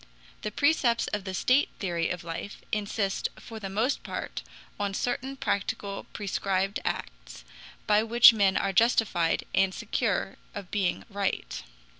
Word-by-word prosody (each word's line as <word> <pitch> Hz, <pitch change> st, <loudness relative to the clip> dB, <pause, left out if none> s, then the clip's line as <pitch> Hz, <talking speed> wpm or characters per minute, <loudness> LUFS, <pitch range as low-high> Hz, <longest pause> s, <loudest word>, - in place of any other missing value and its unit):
The -, -, -2 dB
precepts 260 Hz, -1 st, +2 dB
of 205 Hz, -2 st, -3 dB
the 190 Hz, -, -4 dB
state 255 Hz, +9 st, +3 dB
theory 170 Hz, -4 st, -1 dB
of 180 Hz, 0 st, -4 dB
life 170 Hz, +4 st, -6 dB
insist 205 Hz, -1 st, -1 dB
for 225 Hz, -2 st, -9 dB
the 195 Hz, -2 st, -5 dB
most 220 Hz, +8 st, 0 dB
part -, -, -5 dB, 0.4 s
on 200 Hz, -1 st, -1 dB
certain 260 Hz, +4 st, -2 dB
practical 200 Hz, -3 st, -2 dB
prescribed 195 Hz, -1 st, -1 dB
acts, -, -, -5 dB, 0.4 s
by 210 Hz, 0 st, +4 dB
which 235 Hz, +1 st, +8 dB
men 200 Hz, -3 st, +3 dB
are 195 Hz, -, 0 dB
justified 205 Hz, -6 st, +3 dB
and 190 Hz, -1 st, +3 dB
secure 215 Hz, -3 st, -1 dB, 0.2 s
of 200 Hz, -3 st, -7 dB
being 190 Hz, -4 st, 0 dB
right. 200 Hz, -3 st, -2 dB
200 Hz, 140 wpm, -28 LUFS, 195-230 Hz, 0.4 s, which